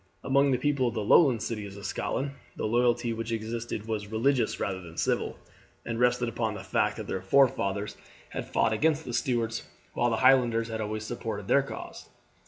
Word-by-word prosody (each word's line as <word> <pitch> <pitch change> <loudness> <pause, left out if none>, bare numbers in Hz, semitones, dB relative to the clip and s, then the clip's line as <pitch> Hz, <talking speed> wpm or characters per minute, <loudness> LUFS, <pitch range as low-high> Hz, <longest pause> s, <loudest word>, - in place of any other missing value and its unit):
Among 140 +1 +3
the 130 - +3
people 135 -1 +1
of 120 - -3
the 110 - -1
Lowland 120 0 +5
cities 105 -3 -5
of 100 - -9
Scotland 140 +1 -2 0.2
the - - -3
loyalty 120 +1 +2
which 115 +1 -4
existed 115 -1 -3
was 105 -2 -3
religious 115 +2 +1
rather 95 -1 -2
than 85 -2 -12
civil, - - 0 0.5
and 115 -1 -3
rested 125 0 +3
upon 115 -2 -2
the - - -7
fact - - 0
that - - -5
their 95 - -3
forefathers 100 -3 +2 0.3
had - - -5
fought 115 -1 +2
against 155 +6 +1
the 120 - -5
Stuarts, 115 -2 0 0.3
while 120 - +2
the 115 - 0
Highlanders 120 -3 +4
had 110 -1 -3
always 110 0 -3
supported 110 -3 -5
their 140 - +5
cause. 140 - -8
115 Hz, 190 wpm, -28 LUFS, 110-125 Hz, 0.5 s, Lowland